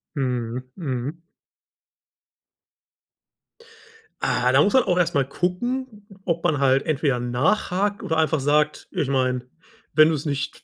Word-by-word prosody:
Mhm, 125 -2 -3
mhm. 145 0 -4 3.0
Ah, 125 +1 +1
da 135 +3 +5
muss 205 - +2
man 260 -2 +5
auch 180 -4 0
erst 175 -2 +1
mal 140 -1 +3
gucken, 210 - -3 0.2
ob 170 -1 -1
man 155 -5 +1
halt 135 -1 +3
entweder 140 -4 0
nachhakt 185 - 0
oder 160 -5 -1
einfach 160 -1 +2
sagt: 150 +2 +1
„Ich 145 - -1
meine, 130 -2 0 0.5
wenn 155 0 +6
du 160 - +1
es 145 - -5
nicht 140 -2 -3
150 Hz, 135 wpm, -23 LUFS, 130-180 Hz, 3.0 s, wenn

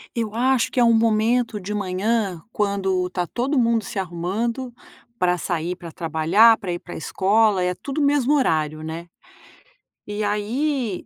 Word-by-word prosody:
Eu 225 -2 -3
acho 255 0 +2
que - - -1
é - - +6
um 230 -1 +5
momento 225 0 +2
de 200 +2 -5
manhã 200 0 -1
quando 195 -3 0
está 180 -1 -2
todo 255 - -2
mundo 230 -2 +2
se 200 - -7
arrumando 195 +8 -3 0.5
para 180 -2 +1
sair, 175 0 -2
para 170 -2 -10
trabalhar, 165 +9 +4
para 185 - -4
ir 175 - -2
para 175 - -10
escola, 200 +3 +2
é 180 0 0
tudo 275 +9 -5
o - - +2
mesmo 285 -1 +2
horário, 155 - 0
né. 165 +2 -6 1.0
E 210 +1 -3
aí, 220 +2 -1
210 Hz, 165 wpm, -22 LUFS, 180-235 Hz, 1.0 s, é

